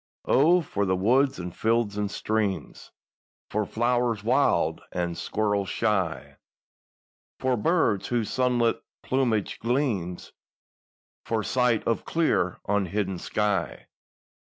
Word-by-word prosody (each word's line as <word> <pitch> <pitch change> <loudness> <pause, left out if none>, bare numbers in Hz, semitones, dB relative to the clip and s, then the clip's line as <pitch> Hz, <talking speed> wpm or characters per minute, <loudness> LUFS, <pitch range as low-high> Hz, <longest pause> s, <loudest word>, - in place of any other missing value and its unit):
O, 170 +6 +4
for 100 -10 -2
the 95 - +2
woods 130 +8 +2
and 90 0 -6
fields 115 -2 +1
and 105 -1 -1
streams, 105 -2 -2 0.6
For 105 -1 -1
flowers 120 -2 0
wild 130 +5 +2
and 85 -1 -2
squirrels 100 +3 -1
shy— 100 -7 -1 1.0
For 130 -1 +1
birds 115 - +1
whose 120 -3 -1
sunlit 125 -2 +1 0.2
plumage 120 -6 0
gleams, 115 - -2 0.9
For 110 -2 -1
sight 125 -2 +1
of 115 - -1
clear, 155 - 0
unhidden 100 -2 -1
sky! 100 - -2
110 Hz, 105 wpm, -26 LUFS, 100-125 Hz, 1.0 s, O